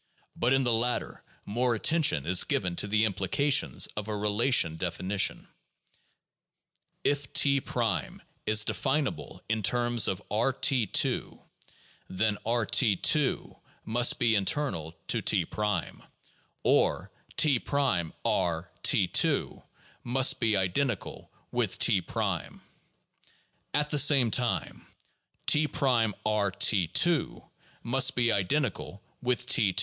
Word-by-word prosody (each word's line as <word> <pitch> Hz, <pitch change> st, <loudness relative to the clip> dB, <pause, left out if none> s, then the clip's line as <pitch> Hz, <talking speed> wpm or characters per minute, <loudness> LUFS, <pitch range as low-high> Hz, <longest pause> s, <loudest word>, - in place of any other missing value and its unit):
But 120 Hz, -, 0 dB
in 135 Hz, 0 st, +3 dB
the 120 Hz, -2 st, +1 dB
latter 120 Hz, +2 st, -1 dB, 0.2 s
more 120 Hz, +3 st, 0 dB
at 110 Hz, -, -7 dB
tention 155 Hz, -, +2 dB
is 90 Hz, +2 st, +3 dB
given 90 Hz, -1 st, -1 dB
to -, -, 0 dB
the 105 Hz, +2 st, +2 dB
implications 110 Hz, +9 st, +1 dB
of 105 Hz, 0 st, -5 dB
a 105 Hz, -1 st, -3 dB
relational 105 Hz, -4 st, +1 dB
definition. 90 Hz, +4 st, -2 dB, 1.6 s
If 145 Hz, -1 st, -1 dB
2" 140 Hz, -1 st, +3 dB, 0.9 s
is 105 Hz, 0 st, +4 dB
definable 140 Hz, +1 st, -3 dB
in 110 Hz, 0 st, -1 dB
terms 120 Hz, +2 st, +2 dB
of 95 Hz, -, -2 dB
B{T 125 Hz, +1 st, +1 dB
2 -, -, 0 dB, 0.4 s
), -, -, -30 dB
then 105 Hz, +2 st, -1 dB
R(T 115 Hz, -1 st, +2 dB
2 145 Hz, -, +1 dB, 0.2 s
) -, -, -34 dB
must 120 Hz, +2 st, +2 dB
be 120 Hz, -2 st, +2 dB
internal 95 Hz, -, -1 dB
to -, -, +1 dB
T, -, -, +1 dB, 1.2 s
or, -, -, +1 dB, 0.3 s
(T')R(T 90 Hz, -, 0 dB
2 -, -, +1 dB, 0.2 s
) -, -, -29 dB
must 130 Hz, +2 st, +2 dB
be 110 Hz, -4 st, +1 dB
identical 95 Hz, +4 st, -2 dB, 0.2 s
with -, -, -2 dB
T. -, -, +2 dB, 1.7 s
At 150 Hz, 0 st, +1 dB
the 150 Hz, -, 0 dB
same 135 Hz, -4 st, +4 dB
time, 120 Hz, 0 st, -2 dB, 0.6 s
(T')R(T 110 Hz, -, +1 dB
2 170 Hz, -3 st, +1 dB, 0.2 s
) -, -, -31 dB
must 130 Hz, +2 st, +2 dB
be 120 Hz, -1 st, +2 dB
identical 100 Hz, 0 st, -2 dB, 0.2 s
with 125 Hz, 0 st, -1 dB
T 120 Hz, -8 st, +2 dB
2 -, -, 0 dB
115 Hz, 115 wpm, -28 LUFS, 100-135 Hz, 1.7 s, is